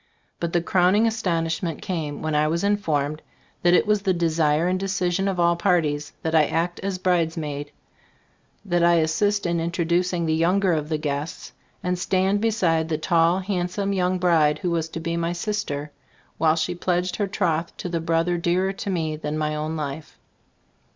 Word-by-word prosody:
But 170 -1 -2
the 170 -1 +1
crowning 185 +5 +3
astonishment 170 -6 -1
came 160 -7 -4
when 155 0 -1
I 150 0 +3
was 170 +3 -1
informed 155 -8 0 0.4
that 175 0 +5
it - - +3
was 210 -1 +2
the 190 -2 +1
desire 160 -1 +2
and 185 +1 0
decision 190 -1 0
of 190 -2 -1
all 170 0 +4
parties, 160 -5 0
that 160 - -1
I 155 -2 +5
act 170 +2 -1
as 195 -1 -3
bridesmaid. 160 -5 -1 1.0
That 175 -3 +1
I 170 -1 +5
as 160 0 0
sist 205 +3 +1
in 170 -1 0
introducing 170 +1 0
the 160 - +1
younger 180 +3 +2
of 150 -1 -2
the 155 - 0
guests, 150 +3 -4 0.3
and 180 0 -1
stand 190 +2 +1
beside 175 -8 +1
the 155 - 0
tall, 170 +3 +2
hand 180 -2 -1
some 200 +2 -2
young 185 -1 +1
bride 160 -4 +3
who 175 +2 -2
was 165 -1 -1
to 165 - -6
be 165 +1 -2
my 170 +1 -1
sister, 175 -7 -3 0.5
while 160 0 +4
she 165 +2 -1
pledged 180 +1 -1
her 205 - 0
troth 170 -4 -1
to - - -5
the 170 -2 -2
brother 165 +1 +1
dearer 180 +3 +1
to 200 - -5
me 160 -4 -1
than 150 0 -3
my 155 0 -1
own 155 +1 -3
life. 150 0 -6
170 Hz, 185 wpm, -24 LUFS, 160-185 Hz, 1.0 s, that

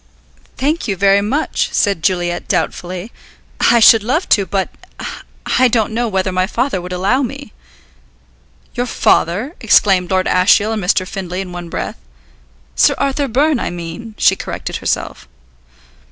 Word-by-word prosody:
"Thank 300 +4 -1
you 200 - -1
very 200 +1 +4
much," 270 +10 -1
said 200 -5 +1
Juliet 175 0 -1
doubtfully. 185 +5 -3 0.5
"I 235 - +4
should 225 0 +7
love 260 - -1
to, 200 -3 +3
but 190 +1 -1 0.9
I 255 - +6
don't 220 -2 0
know 240 +1 0
whether 190 -2 -1
my 185 0 0
father 240 -2 -1
would 180 +1 -8
allow 195 +9 +1
me." 275 +2 -6 1.2
"Your 245 0 -2
father?" 220 - +1
exclaimed 195 -4 +3
Lord 185 -1 +1
Ashiel 200 +4 +3
and 215 -3 -3
Mr. 185 0 +1
Findlay 185 -1 -5
in 185 -2 -7
one 175 -1 -7
breath. - - -5 0.8
"Sir - - +4
Arthur 275 +1 0
Byrne, 280 +3 +1
I - - -2
mean," 175 +6 -8
she - - +4
corrected - - -5
herself. - - -3
200 Hz, 150 wpm, -16 LUFS, 185-245 Hz, 1.2 s, should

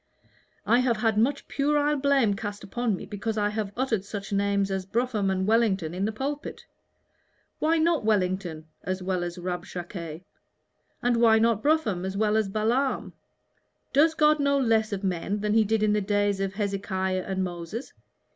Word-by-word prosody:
I 240 - +4
have 250 -3 +2
had 220 0 +1
much 255 +7 +1
puerile 295 +1 +1
blame 275 -6 +3
cast 205 0 -5
upon 225 +2 -1
me - - -8
because 215 +1 -4
I 205 0 +2
have 210 -1 -3
uttered 245 -6 0
such 200 0 -6
names 200 0 +1
as 190 -1 -1
Brougham 225 -2 0
and 190 0 0
Wellington 200 -7 +2
in 190 +2 -1
the 215 - 0
pulpit. 285 +7 -5 0.9
Why 325 +2 +2
not 325 -4 +2
Wellington 185 -6 0 0.2
as 185 0 -3
well 185 -1 -1
as 175 +1 -5
Rabshakeh? 175 -2 -6 0.8
and 240 -1 +2
why 230 -1 +5
not 225 -1 +2
Brougham 260 - +1
as 190 +1 -3
well 215 0 +2
as 220 -2 +1
Balaam? 235 +7 0 0.8
Does 315 +4 +4
God 305 -1 +4
know 280 0 +2
less 225 -4 +2
of 200 0 -3
men 195 +2 -1
than 210 0 0
He 220 0 +5
did 215 +1 +1
in 210 -1 +3
the 210 - +1
days 205 0 +1
of 195 0 -2
Hezekiah 195 -2 -1
and 190 -1 -1
Moses? 175 +7 -6
210 Hz, 175 wpm, -26 LUFS, 190-235 Hz, 0.9 s, why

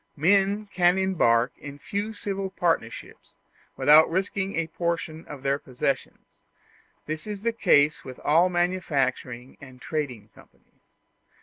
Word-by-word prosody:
Men 200 +6 +2
can 180 0 +3
embark 140 -11 +2
in 145 -1 -9
few 205 +8 -4
civil 195 -2 -4
partnerships 165 -11 -3 0.4
without 155 +2 +6
risking 190 +2 -2
a 165 - 0
portion 165 -1 -3
of 140 -3 -9
their 140 +1 +1
possessions; 130 +1 -4 0.6
this 155 +4 -5
is 205 -1 -6
the 230 0 +1
case 150 -9 +3
with 130 -1 -9
all 165 +5 +4
manufacturing 140 -8 -2
and 130 -2 -13
trading 125 -9 -4
companies. - - -23
160 Hz, 125 wpm, -25 LUFS, 140-190 Hz, 0.6 s, without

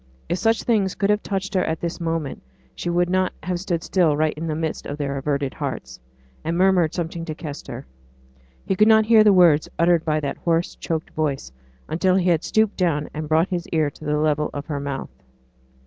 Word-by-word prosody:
If 175 - 0
such 225 0 +2
things 205 -5 +1
could 200 0 +1
have 210 0 +1
touched 195 -1 -3
her 185 -2 +2
at 160 0 -2
this 170 +1 -4
moment, 165 -4 -2 0.3
she 175 - -4
would 175 +1 +2
not 185 +1 +1
have 180 +1 -2
stood 175 -3 -2
still 165 -6 +2
right 155 0 +1
in 160 +2 -5
the 155 - -1
midst 160 0 -3
of 145 - -5
their 140 -2 -2
averted 140 0 -1
hearts, - - -5 0.4
and 165 +1 -1
murmured 180 -3 +3
something 170 -1 -3
to 155 -2 -5
Kester. 140 -4 -7 0.8
He 190 - 0
could 215 +3 +5
not 220 -1 +6
hear 220 -1 +6
the 210 - +6
words 170 -5 +5
uttered 170 -1 +3
by 155 -1 +1
that 140 -2 -3
hoarse 170 0 0
choked 160 -1 -4
voice, 140 - -2 0.4
until 185 +3 +1
he 185 -1 +2
had 165 -1 +1
stooped 220 -1 +1
down 155 -5 0
and 155 0 -5
brought 160 +3 +3
his 175 -2 -3
ear 155 -3 0
to 155 - -15
the 150 0 0
level 150 0 +1
of 145 0 -4
her 145 -3 -3
mouth. 140 -1 -5
165 Hz, 210 wpm, -23 LUFS, 150-185 Hz, 0.8 s, not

